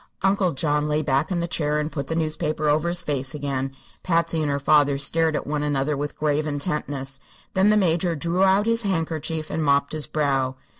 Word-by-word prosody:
Uncle 195 -3 +2
John 150 +1 0
lay 150 +1 0
back 140 +1 +1
in 175 -2 -1
the 170 - -2
chair 150 -2 0
and 150 +1 -3
put 140 -2 -4
the 160 - -2
newspaper 155 -1 -1
over 150 +3 +2
his 175 +1 +1
face 140 -1 -2
again. 135 -2 -3 0.3
Patsy 165 -2 +1
and 150 - 0
her 140 - 0
father 145 0 +3
stared 160 +3 +2
at - - -2
one 150 0 -2
another 145 0 0
with 145 +1 -4
grave 150 0 0
intentness. 145 -3 -2 0.3
Then 190 +2 +3
the 215 - +4
Major 175 -2 +1
drew 170 +5 0
out 195 +2 +4
his 230 0 +2
handkerchief 160 -5 -2
and 160 0 -1
mopped 140 -1 +2
his 155 -5 -1
brow. 135 -3 0
150 Hz, 205 wpm, -23 LUFS, 145-165 Hz, 0.3 s, the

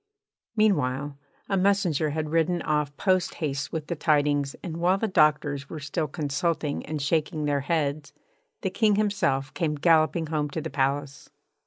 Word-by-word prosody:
Meanwhile, 145 - +1 0.3
a 195 - 0
messenger 185 -6 +2
had 155 0 -3
ridden 165 +2 +1
off 150 -1 -1
posthaste 160 -7 0
with 160 -2 -3
the 170 - -3
tidings, 145 -2 +1
and 165 -3 -5
while 180 +3 +2
the 225 - -1
doctors 150 -5 +2
were 160 - -6
still 150 +2 -2
consulting 150 +1 -2
and 155 0 -3
shaking 155 +2 0
their 145 -1 +1
heads 145 -1 -1 0.5
the 190 - -1
King 210 +1 +3
himself 190 -11 0
came 160 -4 -1
galloping 160 +1 +3
home 150 -1 -1
to 160 +3 -4
the 160 0 -5
palace. 140 +1 -2
155 Hz, 155 wpm, -26 LUFS, 145-175 Hz, 0.5 s, King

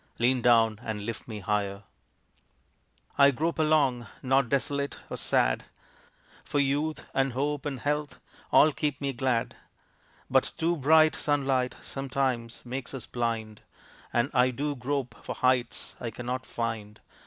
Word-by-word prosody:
Lean 125 +1 +2
down 115 -3 +4
and 105 -2 -4
lift 115 0 -5
me 110 -3 -6
higher. 100 0 -1 1.4
I 140 0 +8
grope 160 +5 -1
along 145 -7 +2 0.2
not 135 -1 +3
desolate 140 +1 -1
or - - -3
sad, - - +1 0.8
For - - -3
youth 145 +3 0
and 135 -1 +1
hope 145 +3 -1
and 135 -4 -4
health 150 +2 -2 0.3
all 155 - +7
keep 145 -1 -2
me 140 -1 -2
glad; 120 -2 0 0.7
But - - +2
too 170 +2 +1
bright 155 +2 +5
sunlight, 135 -3 0
sometimes, 130 -4 -2
makes 125 +1 -5
us 125 - -6
blind, 115 -3 -3 0.5
And 120 +4 +1
I 125 -1 +4
do 145 +3 -2
grope 130 -2 -3
for - - -5
heights 125 -1 0
I 120 - -3
cannot 125 +3 -4
find. 110 -2 -4
130 Hz, 140 wpm, -28 LUFS, 115-140 Hz, 1.4 s, I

